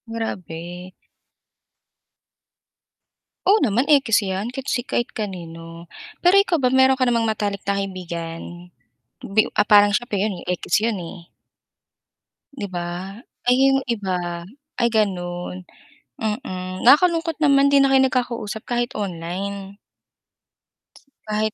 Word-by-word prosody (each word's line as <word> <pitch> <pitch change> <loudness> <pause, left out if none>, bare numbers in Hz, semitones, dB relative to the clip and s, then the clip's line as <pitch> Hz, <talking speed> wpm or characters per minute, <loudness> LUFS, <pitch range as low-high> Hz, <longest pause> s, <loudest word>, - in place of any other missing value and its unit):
Grabe. 180 -5 -6 2.6
Oo 415 - +7
naman 245 +5 0
ekis 270 -7 +4
yan, 200 +6 -3
kahit 270 +1 -5
si 245 - -1
kahit 240 - -1
kanino. 170 -4 -7 0.3
Pero 360 +3 +5
ikaw 360 -6 +3
ba 250 - +3
meron 265 +1 +5
ka 255 -1 +2
namang 230 -1 +1
matalik 205 -2 -2
na 200 - +1
kaibigan, 175 -2 -7 0.5
bi 215 +2 +2
u - - -6
ah, - - +3
parang 205 -1 +6
siya 240 +3 -1
pa 205 - -1
yun 195 -3 -1
ekis 180 +4 0
yun 225 -1 0
eh. 170 0 -9 1.2
'Di 210 -7 -5
ba? 175 +1 -5 0.3
Ay 250 - +5 0.2
yung 270 - +3
iba, 180 -6 -2 0.4
ay 235 - +3
ganun, 180 -4 -2 0.6
mm. 185 -5 -4
Nakakalungkot 330 +4 +4
naman 280 -2 +4
'di 280 - +6
na 275 - +5
kayo 270 0 +5
nagkakausap 240 -4 -2
kahit 240 0 0
online. 195 +2 -5 1.5
Kahit 215 0 0
205 Hz, 125 wpm, -22 LUFS, 180-245 Hz, 2.6 s, Oo